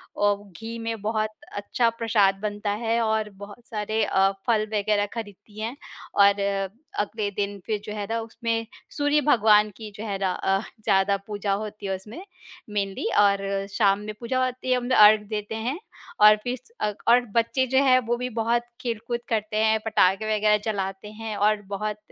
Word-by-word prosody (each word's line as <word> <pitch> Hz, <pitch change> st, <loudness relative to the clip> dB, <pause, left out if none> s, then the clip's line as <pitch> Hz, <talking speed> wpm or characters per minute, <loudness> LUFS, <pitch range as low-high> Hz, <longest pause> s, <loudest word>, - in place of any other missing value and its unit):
और 205 Hz, 0 st, +1 dB
घी 225 Hz, +1 st, -6 dB
में 225 Hz, -2 st, -4 dB
बहुत 215 Hz, 0 st, 0 dB, 0.3 s
अच्छा 230 Hz, +3 st, +1 dB
प्रसाद 225 Hz, -4 st, +2 dB
बनता 205 Hz, -1 st, -2 dB
है 230 Hz, 0 st, +1 dB
और 220 Hz, -1 st, 0 dB
बहुत 205 Hz, +4 st, -11 dB
सारे 215 Hz, 0 st, -1 dB
अ, 195 Hz, 0 st, +3 dB, 0.2 s
फल 220 Hz, -2 st, +3 dB
वगैरह 205 Hz, 0 st, +1 dB
खरीदती 205 Hz, -1 st, -9 dB
हैं 230 Hz, +4 st, -3 dB, 0.4 s
और 200 Hz, 0 st, +5 dB, 0.6 s
अगले 210 Hz, 0 st, -1 dB
दिन 200 Hz, 0 st, -3 dB
फिर 215 Hz, -2 st, -1 dB
जो 210 Hz, -, -5 dB
है 205 Hz, -, -3 dB
ना 230 Hz, -, 0 dB
उसमें 225 Hz, 0 st, -3 dB, 0.3 s
सूर्य 290 Hz, 0 st, +3 dB
भगवान 215 Hz, -5 st, +5 dB
की 220 Hz, -2 st, -8 dB
जो 215 Hz, -, -6 dB
है 200 Hz, -1 st, -2 dB
रा 190 Hz, -1 st, 0 dB
अ, 195 Hz, +1 st, 0 dB, 0.2 s
ज़्यादा 200 Hz, -1 st, +3 dB
पूजा 205 Hz, -1 st, -2 dB
होती 210 Hz, 0 st, -5 dB
है 190 Hz, 0 st, -1 dB
उसमें, 215 Hz, -, -10 dB, 0.5 s
मेनली। 200 Hz, -2 st, -2 dB
और 200 Hz, -1 st, +2 dB
शाम 200 Hz, -1 st, +3 dB
में 210 Hz, +1 st, -6 dB
पूजा 255 Hz, +2 st, 0 dB
होती 255 Hz, 0 st, -3 dB
है, 255 Hz, -, +4 dB
हम 250 Hz, -, -3 dB
लोग 255 Hz, -, +3 dB
अर्ग 210 Hz, 0 st, +8 dB
देते 210 Hz, 0 st, -4 dB
हैं 245 Hz, +9 st, -3 dB, 0.4 s
और 210 Hz, 0 st, +8 dB
फिर 245 Hz, +1 st, -2 dB
स 255 Hz, -, -24 dB
अ, 210 Hz, -, 0 dB
और 240 Hz, +1 st, +6 dB, 0.2 s
बच्चे 235 Hz, +3 st, +2 dB
जो 265 Hz, +2 st, +3 dB
हैं 255 Hz, -2 st, +5 dB
वो 240 Hz, -, +1 dB
भी 250 Hz, +1 st, -3 dB
बहुत 235 Hz, +1 st, 0 dB, 0.2 s
खेल-खुद 235 Hz, 0 st, -3 dB
करते 215 Hz, -1 st, -1 dB
हैं, 220 Hz, 0 st, +3 dB
पटाखे 215 Hz, 0 st, +2 dB
वगैरह 210 Hz, 0 st, +4 dB
चलाते 195 Hz, 0 st, -4 dB
हैं 220 Hz, 0 st, -6 dB
और 210 Hz, +1 st, +2 dB
बहुत 210 Hz, +1 st, -3 dB
215 Hz, 185 wpm, -25 LUFS, 205-230 Hz, 0.6 s, अर्ग